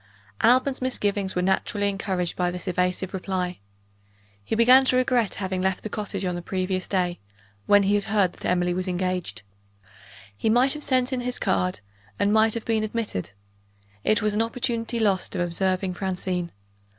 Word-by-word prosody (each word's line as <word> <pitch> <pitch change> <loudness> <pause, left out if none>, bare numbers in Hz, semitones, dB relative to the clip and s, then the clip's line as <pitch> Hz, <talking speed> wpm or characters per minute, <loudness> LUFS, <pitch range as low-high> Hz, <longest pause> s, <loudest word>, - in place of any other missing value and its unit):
Alban's 260 +3 +3
misgivings 205 -6 -1
were 180 - +1
naturally 200 +2 +1
encouraged 190 -3 -2
by 180 -1 0
this 180 +1 -6
evasive 180 +1 -1
reply. 185 -1 -3 0.8
He 105 - -2
began 250 +4 +7
to 255 - +2
regret 250 -5 +2
having 190 -1 -2
left 190 0 0
the 215 - -4
cottage, 200 -3 -4
on 180 - -1
the 175 - -4
previous 185 +1 -2
day, 180 -2 0 0.5
when 205 0 +6
he 195 +1 +2
had 205 -1 +1
heard 200 -4 +2
that - - -14
Emily 180 0 +1
was 185 +1 -2
engaged. 180 - -2 0.9
He 220 - -1
might 250 +4 +4
have 300 - -6
sent 255 -2 +1
in 255 - 0
his 250 0 -3
card, 90 +1 0 0.4
and 205 +1 +2
might 220 0 +4
have 230 - -4
been 220 -1 +1
admitted. 215 - -3 0.7
It 215 - +2
was 215 -1 +1
an 210 - +1
opportunity 230 0 -2
lost 200 -3 +1
of 180 - -1
observing 185 +2 0
Francine. 180 -2 -3
195 Hz, 175 wpm, -25 LUFS, 180-225 Hz, 0.9 s, began